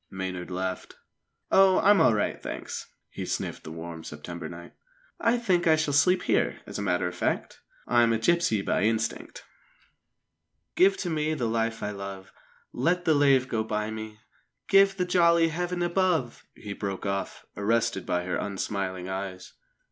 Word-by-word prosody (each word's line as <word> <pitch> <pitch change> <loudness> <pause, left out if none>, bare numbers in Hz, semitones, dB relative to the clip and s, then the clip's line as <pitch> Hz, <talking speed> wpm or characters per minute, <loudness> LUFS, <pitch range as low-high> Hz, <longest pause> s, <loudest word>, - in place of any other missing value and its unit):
Maynard 95 -1 -5
laughed. 95 0 -4 0.6
"Oh, 190 -1 +6
I'm 205 +1 +5
all 110 - +5
right, 105 - -1
thanks!" - - -6 0.2
He - - -6
sniffed - - -4
the 80 - -8
warm 80 0 -7
September 85 +3 -7
night. 85 0 -10 0.5
"I 230 +1 +2
think 185 -7 +1
I 160 - +6
shall 155 -2 -1
sleep 180 +6 +4
here, - - +1
as - - -6
a - - -2
matter 90 -2 0
of 90 - -5
fact. 90 - -2 0.3
I'm 120 -1 +4
a 115 - +2
gipsy 115 -5 +2
by - - 0
instinct 110 +1 -1 1.3
"'Give 195 +1 +5
to 180 - -3
me 155 0 0
the 125 -6 -2
life 115 0 -1
I 105 - -2
love, 100 -1 -8 0.4
Let 175 +7 0
the 160 - +4
lave 140 -3 +4
go 110 -3 -1
by 105 0 -2
me, 110 -1 -7 0.5
Give 195 0 +5
the 180 - 0
jolly 170 -2 +4
Heaven 175 +2 -2
above 175 -8 0
'" - - -49
He 100 -2 -7
broke 100 -1 -5
off, 100 0 -3
arrested 110 +3 0
by 90 0 0
her 90 - -2
unsmiling 95 -2 -3
eyes. 95 -1 -6
115 Hz, 170 wpm, -27 LUFS, -, 1.3 s, Oh